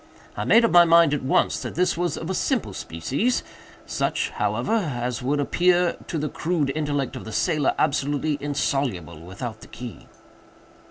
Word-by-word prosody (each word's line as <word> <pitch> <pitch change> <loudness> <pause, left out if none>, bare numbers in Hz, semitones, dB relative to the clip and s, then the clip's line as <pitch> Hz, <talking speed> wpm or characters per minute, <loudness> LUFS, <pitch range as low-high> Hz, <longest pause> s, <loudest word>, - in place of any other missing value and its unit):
I - - -3
made 230 +1 +6
up - - +1
my 175 0 +8
mind, 165 -2 +5
at 150 - 0
once, 130 - +1
that - - -6
this 180 +1 +2
was 175 -2 -1
of 160 - -5
a 190 - -1
simple 255 +5 -1
species—such, 140 - -3
however, - - -1
as 125 - -1
would 140 +4 0
appear, 175 +4 +2
to 165 - -3
the 150 0 -1
crude 155 -3 -1
intellect 145 -3 -2
of 130 - -7
the 110 - -8
sailor, 155 +2 +1
absolutely 145 +1 0
insoluble 135 - -2
without 110 +6 -7
the - - -12
key." 120 -3 -9
145 Hz, 165 wpm, -24 LUFS, 130-175 Hz, -, my